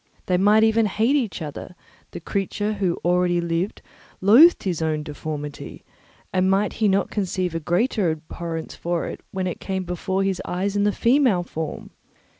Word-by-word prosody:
They 180 - +1
might 210 +4 +5
even 220 0 +3
hate 225 +7 +1
each 230 - -1
other; 155 +4 -8 0.3
the - - -8
creature 205 +4 -2
who 190 -5 -1
already 175 0 +2
lived 170 +3 -2 0.4
loathed 250 - +6
his 175 -4 -2
own 155 -1 -1
deformity, 150 -1 -7 0.5
and 185 0 +2
might 195 +2 +1
he 215 - +4
not 195 0 +1
conceive 185 -3 -2
a 165 - -2
greater 180 - +1
abhorrence 160 +1 -5
for 170 -1 -2
it - - -7
when 190 -1 -3
it 180 - -4
came 190 -1 -3
before 185 +2 -2
his 195 -2 -1
eyes 195 +3 -2
in 205 0 +2
the 205 - +3
female 235 -6 +3
form? 160 -3 -6
185 Hz, 170 wpm, -23 LUFS, 170-205 Hz, 0.5 s, loathed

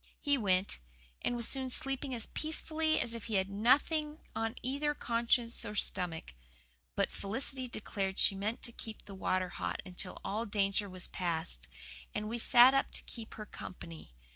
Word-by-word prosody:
He 285 -1 +3
went, 190 - +2 0.4
and 245 - +1
was 235 -1 0
soon 265 -1 -1
sleeping 270 +2 -1
as 230 - -3
peacefully 315 0 0
as 235 - -1
if 230 -2 -6
he 225 - -2
had 190 0 +2
nothing 295 +8 +3 0.2
on 225 +1 -1
either 285 +4 0
conscience 235 -1 +2
or 210 -2 -5
stomach. 175 - +1 0.6
But - - +1
Felicity 255 +5 -1
declared 195 -4 -2
she - - +6
meant 205 +4 -2
to 235 - -5
keep 220 -2 -8
the 200 - -9
water 185 -1 0
hot - - -3
until 185 0 -5
all 220 +4 -1
danger 200 0 +1
was 185 -1 -6
past; 170 -2 -2 0.5
and 210 -1 -1
we 235 +2 -2
sat 245 +2 +8
up 275 - +2
to - - -4
keep 225 -2 -7
her 215 - -6
company. 165 - -9
225 Hz, 170 wpm, -34 LUFS, 195-255 Hz, 0.6 s, sat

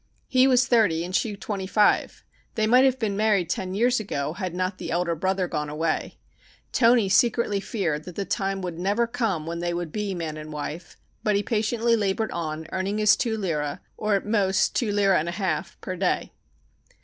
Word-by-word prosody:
He 255 0 +4
was 250 -1 +4
thirty 205 -9 +2
and 180 +1 -4
she 215 -3 0
twenty 195 -2 -4
five. 210 +2 +2 0.3
They 220 - +1
might 250 +4 +5
have 260 -1 +2
married 200 -4 +1
ten 185 +1 -3
years 245 +3 +2
ago 150 -8 -3
had 185 -1 -4
not 185 +1 -2
the - - -5
elder 170 0 0
brother 185 +2 0
gone 150 -3 -3
away. 155 +2 -2 0.5
Toni 230 -3 +4
secretly 210 0 +2
feared 170 -9 -2
that 180 - -9
the 200 - -2
time 195 -1 -2
would 175 -2 -5
never 205 +6 +1
come 225 -9 -2
when 170 +1 -4
they 175 0 -2
would 175 -2 -4
be 205 -1 -3
man 160 -3 -4
and 155 0 -8
wife, 150 +3 -6 0.2
but 210 -1 +1
he 200 - +1
patiently 230 +1 +1
labored 215 +1 -1
on 160 -1 -4
earning 190 +2 -2
his 215 0 +5
two 225 -2 -1
lire, 150 -8 -2 0.2
or 210 -1 0
at 195 - -1
most 200 -3 +1
two 230 -5 +1
lire 200 -1 +3
and 170 -1 +1
a - - -4
half, 175 -3 -2
a 185 - -4
day. 185 0 -1
195 Hz, 195 wpm, -25 LUFS, 170-215 Hz, 0.5 s, might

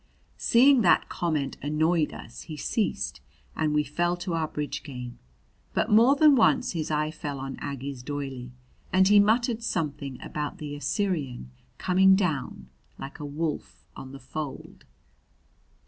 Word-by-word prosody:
Seeing 260 +2 +5
that 180 - +4
comment 155 -6 -2
annoyed 155 +2 +1
us, 115 - -10
he 155 - -6
ceased, 70 - -2 0.3
and 155 -1 0
we 150 0 +2
fell 175 +5 -1
to 175 0 -4
our 160 -1 0
bridge 150 -1 -4
game; 125 -4 -8 0.6
but 220 - +1
more 235 +6 +6
than 295 0 +6
once 230 - +3
his 165 -3 -3
eye 155 0 0
fell 145 -3 -5
on 135 0 -5
Aggie's 140 -2 -5
doily, 135 -2 -5 0.4
and 190 +1 +5
he 205 +1 +7
muttered 230 +3 +2
something 145 - -3
about 150 -1 -5
the 145 -1 -6
Assyrian 145 - -2 0.3
coming 190 +1 +5
down 145 - -2 0.3
like 135 +4 -8
a 150 - -5
wolf 150 +1 -4
on 130 - -9
the 135 - -9
fold. 140 +1 -7
150 Hz, 145 wpm, -27 LUFS, 140-185 Hz, 0.6 s, he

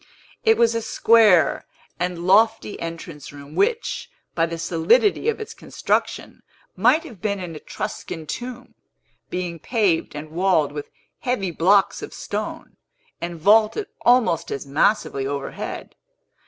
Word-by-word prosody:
It 445 0 +4
was 230 0 +4
a 230 - -1
square 220 -6 +4 0.3
and 175 -1 -2
lofty 220 +2 +3
entrance 165 -2 -7
room, 145 0 -12
which, 460 - 0 0.2
by 165 0 +1
the 165 0 -5
solidity 180 - +2
of 455 - -2
its 435 - -7
construction, - - -2 0.3
might 245 - +4
have 230 - -12
been 200 -2 -1
an 175 -3 -6
Etruscan 155 +1 -6
tomb, 245 - -7 0.6
being 175 -2 -4
paved 200 -8 0
and 155 +1 -7
walled 170 -4 +2
with 145 0 -7 0.3
heavy 240 -8 -1
blocks 190 +5 +3
of - - -8
stone, - - -5 0.4
and 170 -1 -5
vaulted 215 - +3
almost 230 -10 +3
as 140 - -4
massively 140 -1 +1
overhead. 140 0 -5
185 Hz, 130 wpm, -22 LUFS, 165-230 Hz, 0.6 s, It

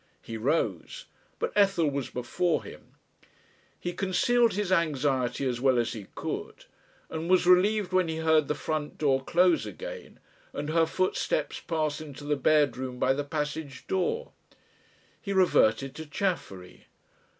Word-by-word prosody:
He 115 - -7
rose, 160 - -1 0.3
but 470 - -2
Ethel 195 -6 +3
was 140 -2 -2
before 160 +8 -1
him. - - -13 0.8
He 175 - -4
concealed 225 +6 +2
his 205 -1 -2
anxiety 140 -7 +1
as 120 -1 -2
well 130 -2 +3
as 120 -1 0
he 105 -4 -8
could; - - -5 0.4
and 160 +2 -5
was 185 -1 +4
relieved 185 +2 +4
when 185 -2 +3
he 160 - -3
heard 160 -2 +3
the 150 - -1
front 155 -2 -3
door 135 -3 +1
close 175 +3 +3
again - - -9 0.3
and 150 - -4
her 165 0 +3
footsteps 185 - -1
pass 155 -3 -2
into 145 -2 -9
the 145 0 0
bedroom 130 -3 +1
by 130 +1 +2
the 145 +2 -2
passage 150 -2 -4
door. 325 - -1 0.9
He 200 - -3
reverted 135 - +3
to 160 -1 -8
Chaffery. 145 - -4
155 Hz, 145 wpm, -28 LUFS, 135-185 Hz, 0.9 s, was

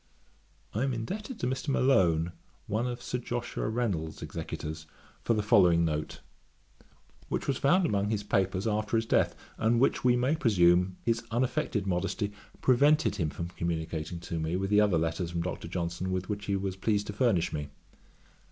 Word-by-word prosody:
I 110 - -1
am 135 -1 0
indebted 210 - -5
to - - -1
Mr. 130 +3 -2
Malone, 90 - +3 0.3
one 110 +4 -1
of 120 -1 -5
Sir 125 - -2
Joshua 120 -2 -3
Reynolds's 100 -10 -2
executors, 80 +1 -6 0.3
for 115 - +1
the 105 - 0
following 90 -5 +5
note, 75 -1 -3 1.1
which - - -2
was 135 - 0
found 175 +6 +4
among 100 -8 +1
his 105 -2 -1
papers 95 -1 0
after 110 +1 0
his 115 - 0
death, - - +2 0.2
and 115 +1 +3
which, 135 - +2
we 125 -1 +5
may 125 +5 +2
presume, 90 - +3
his 115 0 +1
unaffected 120 -2 0
modesty 100 +3 -1 0.3
prevented 145 0 +4
him 80 -6 0
from 85 +3 -5
communicating 85 -1 -3
to 85 -1 -4
me 80 +2 -1
with 95 +2 -2
the 105 0 +6
other 100 -5 +3
letters 80 +2 -1
from 85 0 -2
Dr. 90 - -4
Johnson 85 +1 -3
with 95 0 -2
which 105 0 -3
he 100 - +1
was 95 -1 -2
pleased 105 +1 0
to 105 - -5
furnish 105 -6 +1
me. 75 -1 -4
100 Hz, 175 wpm, -29 LUFS, 85-120 Hz, 1.1 s, the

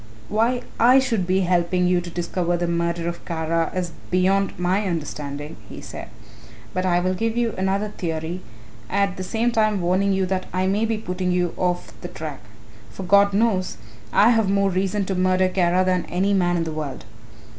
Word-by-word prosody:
"Why 230 +4 +1 0.2
I 245 +3 +7
should 230 -9 +1
be 190 +1 +2
helping 180 0 +1
you 180 0 +3
to 175 - -7
discover 175 0 -1
the 175 - -1
murderer 170 0 -1
of 170 0 -5
Kara 165 0 -1
is 180 -2 -2 0.2
beyond 190 +1 +2
my 180 +4 +1
understanding," 150 -3 -4
he - - -8
said, - - -8 0.7
"but 185 0 0
I 175 -1 +3
will 185 +1 0
give 225 +4 -1
you 235 -2 +1
another 195 +2 0
theory, 170 -2 -4 0.5
at 200 -1 +1
the 185 - -5
same 225 +6 0
time 215 -3 +2
warning 185 +3 +2
you 190 -1 +1
that 185 0 -2
I 185 0 +1
may 200 +4 +1
be 225 -1 -1
putting 180 -3 -2
you 180 -1 0
off 180 -1 -1
the - - -5
track. - - -7 0.5
For 190 - -8
God 200 +2 +5
knows 195 - +1 0.3
I 215 - +5
have 225 -4 +2
more 200 0 +2
reason 190 +2 0
to 195 - -2
murder 185 0 +2
Kara 180 0 +2
than 185 -1 +1
any 195 +3 0
man 175 -2 +2
in 165 - 0
the 160 - -4
world." 150 -6 -5
185 Hz, 190 wpm, -23 LUFS, 175-200 Hz, 0.7 s, I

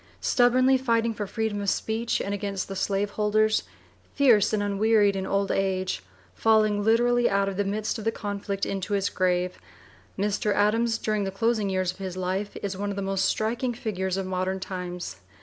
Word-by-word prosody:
Stubbornly 255 +2 +4
fighting 230 -3 +1
for 210 -1 -4
freedom 220 -1 -2
of 200 - 0
speech 225 +4 -1
and 200 - -3
against 200 -1 -3
the 195 - -6
slaveholders, 210 +2 +1 0.5
fierce 235 -8 +5
and 210 -2 0
unwearied 205 0 +3
in 190 0 -3
old 200 0 0
age, 190 - -1 0.3
falling 215 -2 +3
literally 240 +2 +3
out 200 0 +1
of 195 - -3
the 205 - +1
midst 215 +3 -2
of - - -6
the 225 - +1
conflict 200 -2 -3
into 195 +1 -3
his 200 0 +1
grave, 180 -1 0 0.6
Mr. 205 +1 0
Adams, 225 +3 +2
during 215 -2 -1
the 195 - -2
closing 215 +1 0
years 185 -1 0
of 185 - -17
his 185 -1 -5
life, 185 +3 -2
is 200 -1 -2
one 200 +2 -3
of 200 - -3
the 200 - -3
most 195 0 0
striking 235 +4 -1
figures 190 -5 -2
of 195 - -2
modern 185 +1 -2
times. 180 - -5
205 Hz, 185 wpm, -26 LUFS, 195-220 Hz, 0.6 s, fierce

